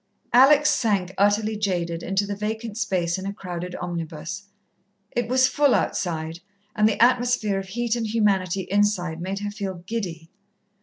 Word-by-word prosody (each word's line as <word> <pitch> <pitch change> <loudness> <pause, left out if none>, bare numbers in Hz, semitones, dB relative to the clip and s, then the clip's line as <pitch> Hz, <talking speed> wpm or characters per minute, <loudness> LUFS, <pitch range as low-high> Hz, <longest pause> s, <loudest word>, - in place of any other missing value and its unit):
Alex 280 +4 +6
sank, 195 -5 0
utterly 210 +2 +2
jaded, 175 -5 -1
into 195 +3 0
the 200 0 -4
vacant 220 +1 -4
space 185 -5 -1
in 190 - -5
a - - -2
crowded 180 -2 -6
omnibus. 170 +3 -5 0.7
It 240 -2 -1
was 255 +1 +4
full 285 -2 +3
outside, 165 -2 -2 0.4
and 215 +1 +4
the 215 - -2
atmosphere 245 -4 +3
of 195 - -7
heat 235 +3 -1
and 230 -2 -2
humanity 195 -4 +1
inside 185 -4 0
made 195 +3 -3
her 205 0 -3
feel 190 -4 -5
giddy. 175 -7 -5
200 Hz, 155 wpm, -24 LUFS, 180-220 Hz, 0.7 s, Alex